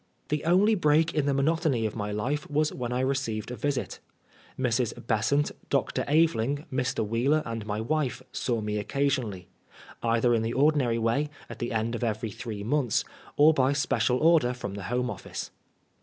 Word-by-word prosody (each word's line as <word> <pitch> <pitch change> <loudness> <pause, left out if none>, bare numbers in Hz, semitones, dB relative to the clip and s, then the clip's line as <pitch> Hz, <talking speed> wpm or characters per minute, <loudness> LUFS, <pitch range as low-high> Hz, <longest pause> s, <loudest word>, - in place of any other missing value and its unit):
The 150 0 -1
only 190 +6 +4
break 160 -4 +3
in 145 -2 0
the 140 - +2
monotony 145 -4 +1
of 110 - -3
my 105 -2 -3
life 135 +8 -2
was 150 +1 +1
when 120 -1 -4
I 125 +1 0
received 130 -5 -1
a - - -4
visit. 145 +1 -2 0.6
Mrs. 125 -2 0
Besant, 120 +6 +1 0.2
Dr. - - 0
Aveling^ 145 -2 +2
Mr. 130 -4 0
Wheeler 135 +8 +2
and 115 -2 -5
my 105 0 -2
wife, 130 -1 -1
saw 120 -3 -1
me 105 0 -2
occasionally; 120 -6 -1 0.5
either 115 +1 +2
in 115 - +2
the 115 +1 -2
ordinary 135 -4 +3
way, 115 +6 +1 0.2
at - - -9
the 120 0 -3
end 115 +1 -1
of 120 - -3
every 110 -1 -2
three 105 -2 -6
months^ 125 0 +1 0.3
or 150 +2 +7
by 135 -1 +2
special 135 -2 +1
order 155 -5 +4
from 105 -5 -5
the 100 -2 -6
Home 125 +1 0
Of&ce. - - -7
125 Hz, 175 wpm, -27 LUFS, 115-145 Hz, 0.6 s, or